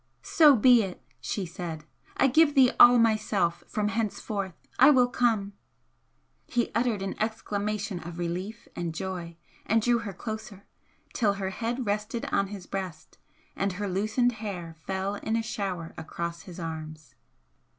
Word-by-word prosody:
"So 300 Hz, -4 st, +6 dB
be 245 Hz, +1 st, +6 dB
it!" 190 Hz, -3 st, -5 dB, 0.2 s
she 200 Hz, -, -3 dB
said 170 Hz, -3 st, -6 dB, 0.3 s
"I -, -, +4 dB
give 295 Hz, +3 st, +4 dB
thee 260 Hz, -2 st, +6 dB
all 245 Hz, 0 st, +9 dB
myself 215 Hz, -6 st, +1 dB
from 210 Hz, -1 st, -1 dB
henceforth! 210 Hz, -4 st, -3 dB, 0.2 s
I 265 Hz, +3 st, +9 dB
will 255 Hz, -4 st, +5 dB
come!" 225 Hz, -5 st, +1 dB, 0.9 s
He 240 Hz, -1 st, 0 dB
uttered 230 Hz, -3 st, 0 dB
an 195 Hz, -, -3 dB
exclamation 210 Hz, -2 st, -2 dB
of 170 Hz, +1 st, -8 dB
relief 185 Hz, +6 st, -4 dB
and 170 Hz, -2 st, -3 dB
joy, 175 Hz, -2 st, -5 dB, 0.3 s
and 225 Hz, -, +2 dB
drew 235 Hz, +2 st, +2 dB
her 215 Hz, -4 st, -6 dB
closer, 215 Hz, 0 st, -7 dB, 0.5 s
till 210 Hz, -4 st, +2 dB
her 195 Hz, -1 st, -3 dB
head 235 Hz, +4 st, -3 dB
rested 210 Hz, +5 st, -2 dB
on 200 Hz, 0 st, +2 dB
his 195 Hz, -2 st, -8 dB
breast 185 Hz, -5 st, -6 dB, 0.4 s
and 195 Hz, -1 st, -1 dB
her 205 Hz, +2 st, -3 dB
loosened 215 Hz, +6 st, +1 dB
hair 195 Hz, -7 st, -6 dB
fell 195 Hz, +1 st, -2 dB
in 220 Hz, -, -2 dB
a 230 Hz, -, 0 dB
shower 195 Hz, -7 st, -4 dB
across 170 Hz, +1 st, -5 dB
his 180 Hz, +1 st, -10 dB
arms. 155 Hz, -2 st, -7 dB
205 Hz, 150 wpm, -28 LUFS, 180-225 Hz, 0.9 s, all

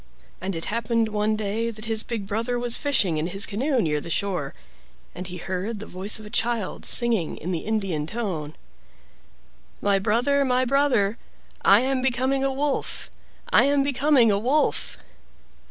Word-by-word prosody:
And 190 Hz, 0 st, -3 dB
it 165 Hz, -, -3 dB
happened 230 Hz, 0 st, 0 dB
one 210 Hz, 0 st, 0 dB
day 215 Hz, +2 st, -2 dB
that 215 Hz, -1 st, -7 dB
his 220 Hz, -1 st, +1 dB
big 225 Hz, -4 st, -4 dB
brother 230 Hz, +5 st, -1 dB
was 240 Hz, -1 st, +2 dB
fishing 205 Hz, -, +1 dB
in 155 Hz, +2 st, -1 dB
his 195 Hz, +4 st, +2 dB
canoe 255 Hz, +6 st, 0 dB
near 150 Hz, -7 st, 0 dB
the -, -, -8 dB
shore, 175 Hz, -6 st, -2 dB, 0.6 s
and 180 Hz, +1 st, -6 dB
he 180 Hz, 0 st, -7 dB
heard 190 Hz, +5 st, -4 dB
the 215 Hz, -, -7 dB
voice 190 Hz, +3 st, -1 dB
of 215 Hz, -, -11 dB
a 210 Hz, -, -10 dB
child 230 Hz, -3 st, -1 dB
singing 230 Hz, -9 st, +1 dB
in 180 Hz, -, -4 dB
the 170 Hz, -, -1 dB
Indian 195 Hz, -8 st, -2 dB
tone: 170 Hz, -9 st, -4 dB, 1.2 s
"My 200 Hz, -1 st, +2 dB
brother, 245 Hz, +8 st, +2 dB
my 255 Hz, -1 st, +2 dB
brother! 245 Hz, -6 st, +2 dB, 0.4 s
I 200 Hz, +3 st, +6 dB
am 260 Hz, 0 st, 0 dB
becoming 260 Hz, +1 st, +1 dB
a 275 Hz, -, +1 dB
wolf, 280 Hz, +1 st, -2 dB, 0.4 s
I -, -, +6 dB
am 280 Hz, 0 st, +3 dB
becoming 275 Hz, -4 st, +3 dB
a 200 Hz, -, +2 dB
wolf!" 265 Hz, +8 st, 0 dB
220 Hz, 170 wpm, -24 LUFS, 195-250 Hz, 1.2 s, I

